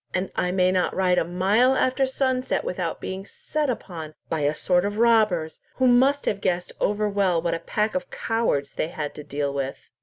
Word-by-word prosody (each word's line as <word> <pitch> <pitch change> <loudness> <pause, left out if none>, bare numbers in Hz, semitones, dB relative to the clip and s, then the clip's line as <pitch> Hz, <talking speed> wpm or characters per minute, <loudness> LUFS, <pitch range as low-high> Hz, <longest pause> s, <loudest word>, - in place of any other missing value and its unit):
And 185 +1 -1
I 180 - 0
may 185 0 +2
not 185 -1 0
ride 180 -1 +3
a - - +1
mile 195 +9 +2
after 260 +1 +2
sunset 260 -1 0
without 180 -2 -3
being 190 +1 -5
set 300 +8 -3
upon 165 -10 -5
by 160 - -1
a 145 +1 +1
sort 180 +2 +2
of 205 +1 -2
robbers, 215 -9 +3 0.2
who 260 - +1
must 265 +3 +4
have 200 -1 -1
guessed 180 -2 -1
over 210 +1 +1
well 195 -4 +1
what 170 0 -1
a 165 - -2
pack 215 +4 -1
of 275 -1 -3
cowards 225 -12 -1
they - - -1
had 150 -3 -5
to 150 - -9
deal 140 -1 -2
with." 135 -1 -5
190 Hz, 205 wpm, -24 LUFS, 165-230 Hz, 0.2 s, must